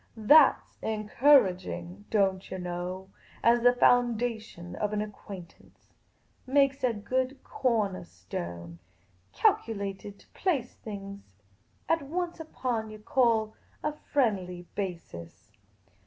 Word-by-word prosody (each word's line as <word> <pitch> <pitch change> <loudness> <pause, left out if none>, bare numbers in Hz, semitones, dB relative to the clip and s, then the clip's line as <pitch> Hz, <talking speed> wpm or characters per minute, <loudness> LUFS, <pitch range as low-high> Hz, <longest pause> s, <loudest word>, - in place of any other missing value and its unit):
" - - -34 0.2
That 310 -3 +8
's - - -33
encourag 215 -2 +3
ing, 180 +4 -7
don't 195 -3 +1
yah 190 - -4
know, 180 +1 -5 0.3
as 235 +1 +5
the 245 +1 +6
foundation 235 -7 +1
of 210 0 -1
an 210 - 0
acquaintance. 195 -4 -12 0.5
Makes 275 0 +3
a 250 - +3
good 255 +5 -2
cornah 215 - -1
stone. 85 -1 -7 0.5
Calculated 200 -2 0
to - - -22
place 285 -10 -1
things 200 - -10 0.4
at 330 0 +2
once 340 +5 -3
upon 250 -8 -3
what 215 - -10
yah - - -9
call 230 -5 +2 0.3
a 300 - 0
friendly 195 -12 -1
basis. 170 - -7
210 Hz, 120 wpm, -29 LUFS, 185-250 Hz, 0.5 s, That